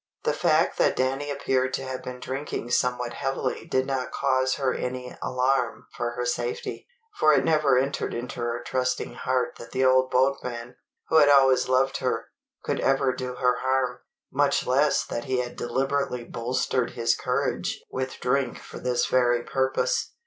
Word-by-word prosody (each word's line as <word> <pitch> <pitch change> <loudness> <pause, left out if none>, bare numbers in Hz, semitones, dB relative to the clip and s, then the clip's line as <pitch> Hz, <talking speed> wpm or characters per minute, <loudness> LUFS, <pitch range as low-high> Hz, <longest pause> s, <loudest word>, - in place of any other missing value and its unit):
The - - +1
fact - - +2
that - - +3
Danny 135 +3 -1
appeared 130 -2 0
to 135 - -4
have 130 -1 -5
been 125 0 -7
drinking 130 -2 -4
somewhat 125 -1 0
heavily 135 -1 -3
did 130 0 +1
not 130 -2 -2
cause 130 -1 +1
her 130 -2 0
any 125 0 -4
alarm 125 -1 0
for 120 0 -2
her 125 0 -3
safety; 120 0 -3 0.3
for 155 0 +6
it - - +3
never 150 -5 +3
entered 135 +2 0
into 120 +1 -5
her 120 0 -2
trusting 130 0 -1
heart 130 0 -1
that 115 - -9
the 130 0 +2
old 130 0 +4
boatman, 125 -2 0 0.3
who 160 - +4
had 145 -2 +7
always 135 -2 +5
loved 130 +1 +2
her, 120 -3 -2 0.3
could - - -1
ever 135 -1 +2
do 125 0 -5
her 125 -1 +2
harm, 130 -1 0 0.3
much - - +2
less 140 +3 +2
that 120 - -4
he 130 -2 0
had 125 -1 -3
deliberately 135 0 -1
bolstered 125 +1 -1
his 115 -1 +2
courage - - -2
with 130 0 -4
drink 135 +1 0
for - - -10
this 125 -1 +1
very 120 -1 +2
purpose. 135 - 0
130 Hz, 170 wpm, -26 LUFS, 125-135 Hz, 0.3 s, had